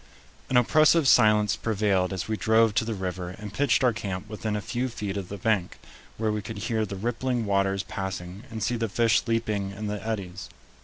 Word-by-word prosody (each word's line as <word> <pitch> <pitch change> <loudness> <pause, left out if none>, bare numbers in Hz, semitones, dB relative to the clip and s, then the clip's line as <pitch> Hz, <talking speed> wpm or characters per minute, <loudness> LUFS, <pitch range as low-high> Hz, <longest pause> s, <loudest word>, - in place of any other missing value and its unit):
An 130 - +3
oppressive 155 +4 +5
silence 105 -4 +5
prevailed 100 -4 0
as 95 -2 -3
we 110 - -1
drove 110 0 +3
to 110 - +1
the 115 -1 -2
river 90 -2 -4
and 105 -1 -8
pitched 135 +1 +2
our 125 -2 +4
camp 100 -2 -5
within 105 0 -3
a - - -1
few 120 +5 -2
feet 105 -4 -4
of 95 -3 -4
the 100 - -5
bank, 100 -2 0 0.4
where 110 -1 0
we 105 0 -2
could 110 +1 -7
hear 110 +1 -1
the 100 - -5
rippling 120 +3 -1
waters 100 -1 +1
passing 95 -1 -5
and 110 -1 -5
see 120 +1 0
the 115 -1 -1
fish 115 +2 +3
leaping 110 -4 0
in 100 +2 -6
the 105 0 -4
eddies. 100 -4 -4
105 Hz, 205 wpm, -26 LUFS, 100-115 Hz, 0.4 s, oppressive